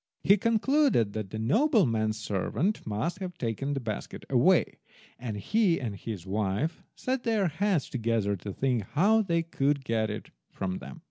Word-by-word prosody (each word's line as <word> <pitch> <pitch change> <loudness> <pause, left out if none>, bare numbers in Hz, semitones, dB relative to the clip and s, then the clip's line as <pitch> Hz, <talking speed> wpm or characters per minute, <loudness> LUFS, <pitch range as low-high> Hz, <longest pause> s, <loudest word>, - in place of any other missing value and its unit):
He 200 - +6
concluded 230 - +2
that 110 -3 -4
the 110 - -5
nobleman's 115 - +2
servants 115 - -1
must 110 - -2
have 180 -3 -6
taken 130 +5 -2
the - - -1
basket 110 -5 -5
away, - - +3 0.4
and 115 -4 -4
he 195 - +2
and 115 -6 -4
his 100 -3 -6
wife 105 - -1
set 260 0 -2
their 220 -5 +1
heads 180 0 0
together 115 -4 0
to 100 +3 -6
think 125 +2 0
how 205 +9 +4
they 170 -5 +1
could 140 -4 0
get 110 -2 0
it 105 - -6 0.2
from 95 -1 -3
them. - - -10
130 Hz, 160 wpm, -28 LUFS, -, 0.4 s, He